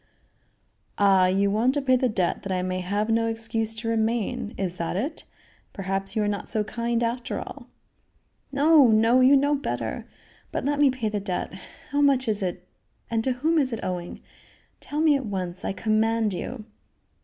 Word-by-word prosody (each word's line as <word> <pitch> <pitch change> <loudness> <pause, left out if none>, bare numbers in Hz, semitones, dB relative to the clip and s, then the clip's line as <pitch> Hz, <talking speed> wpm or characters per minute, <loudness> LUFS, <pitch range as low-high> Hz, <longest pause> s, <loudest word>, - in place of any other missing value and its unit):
"Ah! 195 -2 +5
you 195 +2 +2
want 235 +6 +2
to 290 - +1
pay 260 -1 +4
the 255 0 +1
debt 185 -5 0
that 195 - -5
I 180 -1 0
may 185 0 -2
have 205 +4 -1
no 230 0 +2
excuse 225 0 -2
to 225 +1 -5
remain? 225 -1 -1
Is 180 -2 -3
that 170 +1 -3
it? 280 - -3 0.5
Perhaps 195 +1 -3
you 215 - +1
are - - 0
not 205 -1 -3
so 215 - +1
kind 235 +2 -2
after 235 +1 -2
all." - - -8 0.8
"No! 290 0 +5
no! 225 +3 +4
you 260 +2 +6
know 285 +2 +2
better. 285 0 -3 0.4
But - - -3
let 290 0 0
me 290 -2 +6
pay 250 -4 -2
the 210 -1 -2
debt. 190 -3 -3 0.4
How 285 +1 +1
much 275 -3 +3
is 210 -1 +1
it 180 -1 -4 0.4
and 225 -1 0
to 260 - +1
whom 315 +6 +1
is 265 -3 +1
it 230 - -4
owing? 175 -1 -4 0.6
Tell 300 +1 -3
me 310 -2 +5
at 270 -4 -2
once, 185 -2 -4
I - - -1
command 220 +2 +1
you." 220 +4 -6
225 Hz, 190 wpm, -25 LUFS, 195-255 Hz, 0.8 s, you